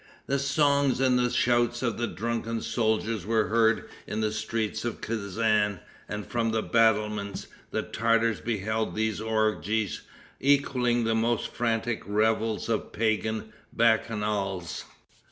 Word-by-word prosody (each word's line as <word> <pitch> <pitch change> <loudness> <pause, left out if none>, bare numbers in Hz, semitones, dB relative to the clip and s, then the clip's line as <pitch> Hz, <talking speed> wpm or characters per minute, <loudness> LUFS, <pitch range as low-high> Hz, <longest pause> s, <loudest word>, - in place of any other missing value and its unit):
The 140 +1 0
songs 140 -1 +2
and 130 -1 +3
the 125 0 +2
shouts 120 0 +2
of 115 -4 -1
the 120 - 0
drunken 115 +1 -3
soldiers 110 -2 0
were 110 +2 +1
heard 115 0 +3 0.2
in 105 - -3
the 110 -1 +1
streets 110 0 -2
of 120 -1 -3
Kezan, 105 -2 0 0.3
and, 105 0 -4
from 115 -1 -1
the 110 0 0
battlements, 105 -3 +1 0.2
the - - -2
Tartars 115 0 +1
beheld 110 0 -2
these 110 -1 -1
orgies, 110 -1 0 0.4
equaling 125 -4 +2
the 115 0 +1
most 115 +1 +1
frantic 115 -1 -1
revels 110 +1 +1
of 115 -2 -1
pagan 110 0 -1 0.2
bacchanals. 105 -5 0
110 Hz, 130 wpm, -27 LUFS, 110-120 Hz, 0.4 s, and